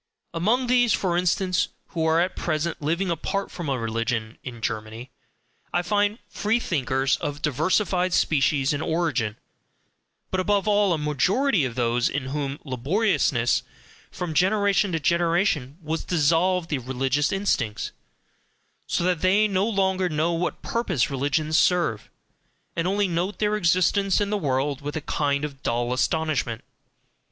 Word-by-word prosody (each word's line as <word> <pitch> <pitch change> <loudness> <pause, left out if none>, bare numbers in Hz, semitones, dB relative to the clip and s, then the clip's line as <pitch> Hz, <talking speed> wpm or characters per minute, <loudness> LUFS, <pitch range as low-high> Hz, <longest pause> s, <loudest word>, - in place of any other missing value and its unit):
Among 220 +10 +1
these, 245 -2 +3
for 180 -3 0
instance, 180 0 +1 0.2
who 165 - -2
are 160 +1 +3
at 180 +1 0
present 155 0 -2
living 170 +5 0
apart 195 +4 -2
from 170 -5 -5
religion 115 -2 -2
in 120 -2 -7
Germany, 110 +2 -5 0.6
I 175 - 0
find 205 +2 +1
"free 220 +3 0
thinkers" 135 - 0
of 145 -1 -5
diversified 180 - +1
species 145 -4 +2
and 145 - -2
origin, 160 -11 -1 0.9
but 185 - 0
above 200 +2 +1
all 205 -2 +3
a - - 0
majority 165 - +1
of 120 -3 -4
those 120 0 +1
in 130 -1 -3
whom 140 -2 -2
laboriousness 135 - +1 0.5
from 175 -3 -5
generation 200 +3 +2
to 165 - +1
generation 165 -3 +1
has 160 +1 -2
dissolved 170 +2 +1
the 145 - 0
religious 130 +3 0
instincts; 145 - -1 1.0
so - - 0
that 180 -3 +1
they 200 +4 +4
no 195 +2 +1
longer 190 -3 +1
know 160 +2 0
what 170 +2 -2
purpose 185 - 0
religions 145 +4 +1
serve, 170 - +1 0.7
and 170 +1 0
only 200 +1 +1
note 180 +3 -2
their 210 0 +1
existence 185 +1 +2
in 205 0 -1
the - - +1
world 140 -1 -1
with 145 +1 -5
a 155 - -2
kind 140 0 0
of 140 -2 -9
dull 120 +1 -1
astonishment. 135 -3 -1
165 Hz, 145 wpm, -24 LUFS, 135-190 Hz, 1.0 s, they